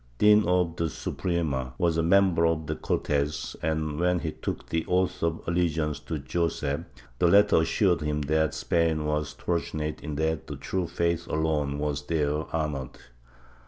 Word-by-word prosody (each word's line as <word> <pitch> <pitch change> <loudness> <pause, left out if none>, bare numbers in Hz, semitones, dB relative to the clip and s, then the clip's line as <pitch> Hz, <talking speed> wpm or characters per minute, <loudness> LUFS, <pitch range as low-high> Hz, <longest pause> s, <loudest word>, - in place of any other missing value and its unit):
Dean 105 0 +6
of 90 -2 +1
the 85 -1 0
Suprema, 70 -7 -2
was 85 -2 +2
a 80 - +2
member 90 0 +4
of 80 -1 0
the - - -2
Cortes 75 +1 -1
and, 80 -1 -1
when 90 +1 +2
he 80 -2 -3
took - - -5
the 80 0 0
oath 90 0 +1
of 85 0 0
allegiance 80 -3 0
to 80 - -4
Joseph, 75 0 -1 0.4
the 90 - +4
latter 100 +3 +6
assured 90 +2 +2
him 75 0 -1
that 80 +2 +1
Spain 80 -2 +1
was 75 -1 -1
fortunate 80 -3 -3
in 75 -2 -5
that 80 0 -1
the - - -5
true 95 -2 -2
faith 85 0 -1
alone 75 -3 0
was 75 -1 -2
there 75 -1 0
honored. 75 -5 -3
80 Hz, 160 wpm, -27 LUFS, 75-85 Hz, 0.4 s, Dean